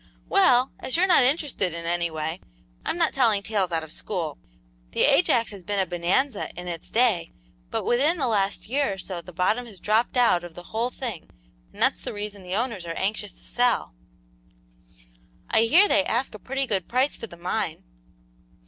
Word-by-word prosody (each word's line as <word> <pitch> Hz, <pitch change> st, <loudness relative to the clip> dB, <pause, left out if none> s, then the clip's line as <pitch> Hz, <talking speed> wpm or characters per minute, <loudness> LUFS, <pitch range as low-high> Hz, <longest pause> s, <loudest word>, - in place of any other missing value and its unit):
"Well, 260 Hz, -10 st, +4 dB
as 260 Hz, -, 0 dB
you're 365 Hz, -, +4 dB
not 360 Hz, -6 st, +6 dB
interested 255 Hz, -, 0 dB
in 170 Hz, 0 st, -6 dB
any 170 Hz, 0 st, 0 dB
way, 160 Hz, +2 st, -4 dB, 0.4 s
I'm -, -, -2 dB
not 330 Hz, -2 st, +2 dB
telling 225 Hz, -6 st, +3 dB
tales 200 Hz, -4 st, 0 dB
out 165 Hz, -1 st, 0 dB
of 160 Hz, -, -9 dB
school. -, -, -4 dB, 0.5 s
The -, -, 0 dB
Ajax 230 Hz, -2 st, +4 dB
has 200 Hz, -2 st, -9 dB
been 205 Hz, +3 st, -2 dB
a 190 Hz, -, +2 dB
bonanza 185 Hz, +8 st, 0 dB
in 180 Hz, -, -7 dB
its 170 Hz, -2 st, -6 dB
day, 220 Hz, -8 st, +2 dB, 0.4 s
but -, -, -3 dB
within 285 Hz, +8 st, +2 dB
the 280 Hz, -, 0 dB
last 205 Hz, -5 st, 0 dB
year 270 Hz, -2 st, 0 dB
or -, -, -8 dB
so 185 Hz, -2 st, -5 dB
the 180 Hz, -, -12 dB
bottom 200 Hz, +8 st, 0 dB
has 200 Hz, -5 st, -11 dB
dropped 220 Hz, +6 st, +1 dB
out 230 Hz, -8 st, +4 dB
of 175 Hz, -2 st, -10 dB
the 175 Hz, -, -9 dB
whole 230 Hz, +3 st, 0 dB
thing, 235 Hz, -9 st, -6 dB, 0.4 s
and -, -, -16 dB
that's -, -, +2 dB
the -, -, -5 dB
reason 205 Hz, -1 st, -6 dB
the 180 Hz, 0 st, -4 dB
owners 220 Hz, -6 st, -2 dB
are 165 Hz, -, -3 dB
anxious 195 Hz, -, -2 dB
to -, -, -19 dB
sell." -, -, +1 dB, 1.6 s
"I 220 Hz, -, +5 dB
hear 350 Hz, -, +6 dB
they 295 Hz, -, +3 dB
ask 240 Hz, 0 st, -1 dB
a 215 Hz, -, -9 dB
pretty 270 Hz, +6 st, -2 dB
good 195 Hz, -7 st, -2 dB
price 255 Hz, +4 st, +1 dB
for 230 Hz, -, -7 dB
the 170 Hz, -, -13 dB
mine." 180 Hz, -1 st, -2 dB
210 Hz, 195 wpm, -25 LUFS, 175-250 Hz, 1.6 s, not